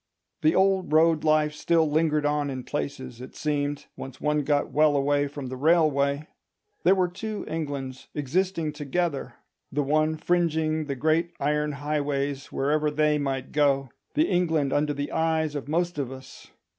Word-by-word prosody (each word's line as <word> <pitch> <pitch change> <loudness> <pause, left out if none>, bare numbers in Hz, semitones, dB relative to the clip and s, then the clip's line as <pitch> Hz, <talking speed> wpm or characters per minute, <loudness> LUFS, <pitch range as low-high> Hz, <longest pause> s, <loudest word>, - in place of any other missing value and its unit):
The 155 - +3
old 190 -3 +2
road 160 0 +4
life 155 -1 +3
still 165 +1 +2
lingered 150 0 +1
on 145 -1 +1
in 130 -2 -5
places, 130 -4 -5
it 130 - -10
seemed, 145 -1 -2
once 130 -1 -8
one 150 0 +1
got 145 0 0
well 150 -1 +4
away 145 +1 +2
from 145 -1 -7
the 130 - -5
railway: 145 -1 +2 0.6
there 185 +3 +5
were 185 -1 +2
two 210 +4 -5
Englands 140 -5 -4
existing 160 +2 -1
together, 150 +1 -2 0.4
the 145 +1 0
one 155 +2 +1
fringing 160 -2 +1
the 140 -2 -3
great 160 +5 +1
iron 150 +1 0
highways 140 -1 -2
wherever 150 +2 +1
they 150 0 +2
might 135 -2 -3
go—the 140 - +1
England 160 -6 +1
under 145 0 +1
the 145 +1 -3
eyes 160 -1 +1
of 145 -2 -5
most 170 +1 -1
of 135 -3 -2
us. 130 0 -11
150 Hz, 155 wpm, -26 LUFS, 140-160 Hz, 0.6 s, there